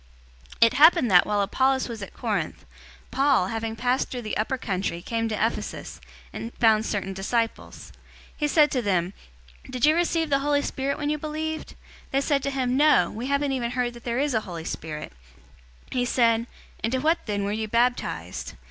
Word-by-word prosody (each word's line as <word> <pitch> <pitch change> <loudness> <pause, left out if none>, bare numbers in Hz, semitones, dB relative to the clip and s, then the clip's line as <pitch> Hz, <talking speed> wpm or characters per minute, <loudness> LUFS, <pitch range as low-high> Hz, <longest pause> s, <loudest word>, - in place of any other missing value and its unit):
019:001 - - +10
It 230 - +2
happened 300 - +6
that, 180 -1 +6
while 205 -1 +1
Apollos 265 +6 +1
was 230 -3 -7
at 195 - -8
Corinth, - - -3 0.5
Paul, 270 -9 +3
having 225 0 -3
passed 250 +3 0
through 245 -2 -5
the 215 - -3
upper 220 +5 -1
country, 190 -6 -2
came 225 +5 -2
to 215 - -1
Ephesus, 225 +2 -3 0.3
and 230 - -6
found 220 -2 +3
certain 195 -2 -2
disciples. 225 +4 -3
019:002 - - -28 0.4
He 295 - 0
said 295 0 +4
to 255 - 0
them, 185 -4 0 0.6
"Did 255 0 +1
you 305 - +5
receive 330 -2 0
the 275 - +4
Holy 285 0 +1
Spirit 275 +1 -2
when 295 0 -1
you 300 - -2
believed?" 315 +1 -4 0.3
They 275 - +1
said 280 0 +1
to 275 - -1
him, 260 -2 -1
"No, 300 +2 +4
we 235 +4 -5
haven't 280 0 +1
even 245 -3 -1
heard 245 -1 -1
that 240 0 -13
there 235 0 -2
is 285 0 +1
a 220 - +1
Holy 170 -5 -7
Spirit." 155 - -6 0.8
019:003 - - -5
He 245 - +2
said, 230 -1 +2 0.4
"Into 240 +4 0
what 320 +5 +2
then 205 -1 -1
were 200 - -1
you 220 +1 -2
baptized?" 230 - -1
245 Hz, 195 wpm, -25 LUFS, 215-275 Hz, 0.8 s, 019:001